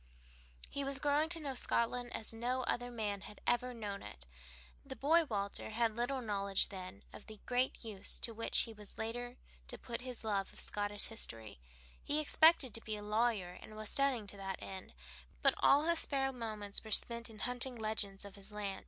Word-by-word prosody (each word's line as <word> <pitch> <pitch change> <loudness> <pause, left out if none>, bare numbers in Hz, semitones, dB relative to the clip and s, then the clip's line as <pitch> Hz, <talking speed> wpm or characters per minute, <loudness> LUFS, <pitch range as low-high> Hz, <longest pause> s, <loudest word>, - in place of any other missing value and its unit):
He 280 - -3
was 275 0 0
growing 290 +2 +2
to 335 -1 +3
know 285 -3 -3
Scotland 245 0 0
as 220 - -4
no 250 +3 0
other 245 0 -1
man 210 -4 -2
had 210 - -10
ever 250 +1 +2
known 210 -4 -4
it. - - -9 0.6
The 265 - -7
boy 320 +7 +4
Walter 200 -6 -2
had 225 0 +1
little 250 +3 0
knowledge 200 -2 +1
then 185 -2 -8
of - - -11
the 215 -2 -9
great 250 0 +1
use 205 -3 -2
to 230 - +1
which 230 +1 +2
he 230 - -3
was 210 -2 -9
later 245 +3 -3 0.3
to - - -6
put 235 0 -5
his 250 -2 -7
love 200 -3 0
of - - -8
Scottish 205 0 +1
history; 115 - -3 0.4
he 295 - +2
expected 305 -4 +5
to 225 - -4
be 215 -1 -3
a 210 - -6
lawyer 210 -4 +1
and 215 - -11
was 215 0 -6
studying 275 -6 +3
to 200 0 -8
that 195 -1 -3
end, 190 - -8 0.5
but - - +6
all 285 +2 +6
his 335 0 +2
spare 270 -1 +1
moments 215 -4 -3
were 220 - -9
spent 235 +2 +1
in 220 - -11
hunting 250 +3 +2
legends 215 -3 -2
of 200 - -9
his 200 +1 -5
land. 205 -2 -3
225 Hz, 195 wpm, -36 LUFS, 205-250 Hz, 0.6 s, but